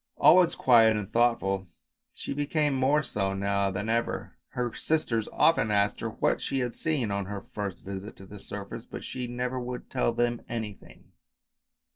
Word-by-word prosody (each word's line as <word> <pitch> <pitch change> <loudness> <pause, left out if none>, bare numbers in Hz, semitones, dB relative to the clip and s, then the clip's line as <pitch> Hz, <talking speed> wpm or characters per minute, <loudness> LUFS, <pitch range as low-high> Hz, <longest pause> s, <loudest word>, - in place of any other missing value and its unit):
Always 180 -1 +6
silent 115 -3 +5
and 105 -2 -5
thoughtful, 100 -5 +2 0.4
she - - -5
became 145 +1 0
more 135 +3 +3
so 100 -6 -2
now 100 0 +1
than 95 +3 -3
ever. 115 +1 -1 0.2
Her 120 -2 -2
sisters 120 -9 0
often 160 -9 +3
asked 100 0 +2
her 115 - -2
what 110 - 0
she 135 - -2
had 125 -2 -1
seen 140 -9 -1
on 100 -1 -1
her 100 -1 -5
first 100 -4 -4
visit 100 +2 -6
to 95 - -13
the 100 +1 -11
surface, 100 0 -7
but - - -8
she 125 -1 -4
never 125 +1 -2
would 125 0 -6
tell 125 -2 +1
them 120 0 0
anything. 110 -4 -7
115 Hz, 170 wpm, -28 LUFS, 100-125 Hz, 0.4 s, Always